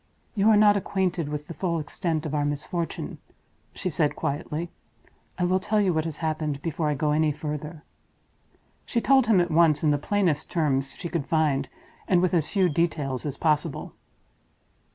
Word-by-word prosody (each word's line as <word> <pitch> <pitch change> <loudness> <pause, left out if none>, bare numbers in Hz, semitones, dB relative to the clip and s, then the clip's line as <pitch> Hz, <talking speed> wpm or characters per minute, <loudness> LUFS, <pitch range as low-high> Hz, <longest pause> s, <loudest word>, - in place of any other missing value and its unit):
"You 210 0 +3
are 215 - +6
not 205 -1 +6
acquainted 185 -5 -1
with 150 0 -4
the 170 - -8
full 170 -1 -1
extent 160 +1 -2
of 155 - -4
our 145 -1 +1
misfortune," 145 +4 -3 0.6
she 190 - -4
said, 155 -3 0
quietly. 155 +3 -3 0.7
"I 180 - -1
will 185 +1 +2
tell 210 +3 0
you 195 -3 +2
what 160 0 0
has 160 -3 -4
happened 155 -3 -2
before 160 -1 -1
I 150 - 0
go 150 +2 0
any 155 0 +2
further." 150 +1 -6 1.0
She 235 - -1
told 265 0 +4
him 215 -5 +5
at 175 -1 +1
once, 155 -2 +4
in 150 - +4
the 145 - +1
plainest 175 -3 0
terms 135 -4 0
she 175 - -6
could 165 -4 -3
find, 145 -4 +1 0.4
and 180 - +4
with 180 0 +1
as 160 -3 +3
few 190 -2 +2
details 150 -5 -1
as 140 -1 -5
possible. 155 -1 0
160 Hz, 180 wpm, -26 LUFS, 150-180 Hz, 1.0 s, are